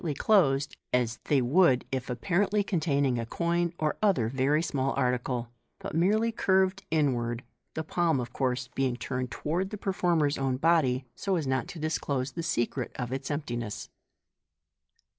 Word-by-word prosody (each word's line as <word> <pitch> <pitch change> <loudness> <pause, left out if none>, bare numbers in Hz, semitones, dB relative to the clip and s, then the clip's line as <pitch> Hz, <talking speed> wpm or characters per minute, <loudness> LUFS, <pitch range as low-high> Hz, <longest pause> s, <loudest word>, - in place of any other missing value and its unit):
v 155 -4 -1
closed, 140 -10 +3 0.2
as 120 -2 0
they 140 -4 +3
would 130 0 +4
if 130 -2 -3
apparently 195 +10 +1
containing 145 - +1
a 115 - -2
coin 170 +4 0
or 155 -1 -1
other 185 - +3
rery 140 +4 +2
small 135 -3 -1
article, 125 -1 0 0.3
but - - -7
merely 210 +8 +2
curved 190 -2 +2
inward, 125 -6 0 0.3
the 160 - -2
palm, 165 -3 +1
of 120 0 -5
course, 125 -1 -1
being 130 -2 0
turned 125 +1 -3
toward 170 +9 -2
the 210 - -5
performer's 175 -7 +1
own 135 -1 0
body, 140 -4 +2
so 195 -1 -1
as 160 -4 -1
not 130 0 0
to - - -8
disclose 140 -4 -1
the 170 - -4
secret 130 -6 -1
of 125 0 -4
its 135 0 -4
emptiness. 120 -7 -4
140 Hz, 160 wpm, -28 LUFS, 125-170 Hz, 0.3 s, would